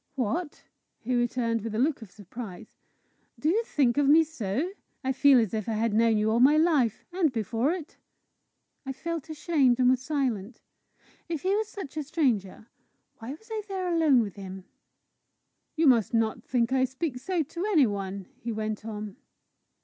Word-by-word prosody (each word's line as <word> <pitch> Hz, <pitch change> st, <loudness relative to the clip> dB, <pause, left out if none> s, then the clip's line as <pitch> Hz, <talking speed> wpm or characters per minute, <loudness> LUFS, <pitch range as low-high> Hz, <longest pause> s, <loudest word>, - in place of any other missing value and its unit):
"What!" 290 Hz, -, -2 dB, 0.3 s
he 250 Hz, +3 st, -3 dB
returned, 240 Hz, -1 st, 0 dB
with 220 Hz, 0 st, -5 dB
a -, -, -1 dB
look 275 Hz, +2 st, +1 dB
of 220 Hz, -, -10 dB
surprise; 210 Hz, +1 st, -10 dB, 0.6 s
"do 305 Hz, -, 0 dB
you 435 Hz, +7 st, +2 dB
think 275 Hz, -, +1 dB
of 280 Hz, -1 st, +3 dB
me 320 Hz, +2 st, +7 dB
so? 295 Hz, -, -3 dB, 0.3 s
I 265 Hz, -, 0 dB
feel 270 Hz, 0 st, +6 dB
as 220 Hz, -3 st, 0 dB
if 215 Hz, 0 st, -2 dB
I -, -, 0 dB
had 220 Hz, 0 st, 0 dB
known 225 Hz, 0 st, +3 dB
you 215 Hz, +1 st, +1 dB
all 230 Hz, -, +2 dB
my 280 Hz, +5 st, +6 dB
life 305 Hz, -9 st, +2 dB
and 350 Hz, -5 st, +2 dB
before 230 Hz, -, 0 dB
it!" 340 Hz, -3 st, -6 dB, 0.9 s
I 270 Hz, -1 st, -4 dB
felt 325 Hz, +2 st, -5 dB
ashamed, 295 Hz, -5 st, +2 dB
and 250 Hz, 0 st, +5 dB
was 255 Hz, -1 st, +1 dB
silent. 255 Hz, -7 st, -2 dB, 0.7 s
If 325 Hz, -4 st, -3 dB
he 385 Hz, +2 st, +2 dB
was 435 Hz, 0 st, 0 dB
such 380 Hz, -9 st, -8 dB
a 305 Hz, -, -1 dB
stranger, 245 Hz, -, -1 dB, 0.5 s
why 225 Hz, +1 st, -8 dB
was 385 Hz, +9 st, -15 dB
I 440 Hz, -1 st, -2 dB
there 370 Hz, -3 st, -2 dB
alone 305 Hz, -7 st, +4 dB
with 205 Hz, -3 st, -5 dB
him? 190 Hz, -1 st, -8 dB, 1.1 s
"You 325 Hz, 0 st, +2 dB
must 240 Hz, -4 st, +4 dB
not 225 Hz, -1 st, 0 dB
think 245 Hz, 0 st, 0 dB
I 260 Hz, -1 st, +3 dB
speak 260 Hz, 0 st, -4 dB
so 345 Hz, +4 st, -1 dB
to 340 Hz, +6 st, -5 dB
any 310 Hz, -9 st, +5 dB
one," 195 Hz, -2 st, -4 dB
he 235 Hz, -, -4 dB
went 215 Hz, -1 st, -3 dB
on. 210 Hz, -1 st, -6 dB
255 Hz, 180 wpm, -27 LUFS, 220-310 Hz, 1.1 s, me